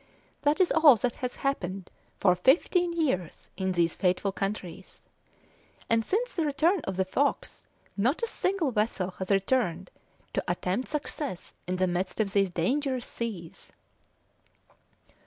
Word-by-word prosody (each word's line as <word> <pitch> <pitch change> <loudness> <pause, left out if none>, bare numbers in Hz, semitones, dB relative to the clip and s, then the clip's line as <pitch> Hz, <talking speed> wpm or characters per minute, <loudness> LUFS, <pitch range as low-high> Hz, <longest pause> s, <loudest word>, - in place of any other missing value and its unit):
That 290 +3 +2
is 370 - +4
all 310 -5 +7
that 240 +2 -1
has 250 -1 -2
happened 195 -9 -2 0.3
for 185 -3 +5
fifteen 340 - +3
years 265 - -2
in 190 -1 -1
these 170 -2 +2
fateful 185 +2 +1
countries, 195 -2 -5 0.9
and 225 0 +4
since 475 - -1
the 335 - 0
return 315 +6 +2
of 190 -1 -3
the 190 - +2
Fox 280 +9 -1 0.3
not 250 - +1
a - - +2
single 370 - 0
vessel 210 -4 0
has 185 - -4
returned 195 -3 +1 0.4
to - - 0
attempt 180 +6 -1
success 290 - -5
in 180 - -1
the 185 0 +2
midst 180 +3 -2
of 200 -3 0
these 195 -2 +3
dangerous 255 - -1
seas." 195 -8 -6
210 Hz, 140 wpm, -28 LUFS, 185-285 Hz, 0.9 s, all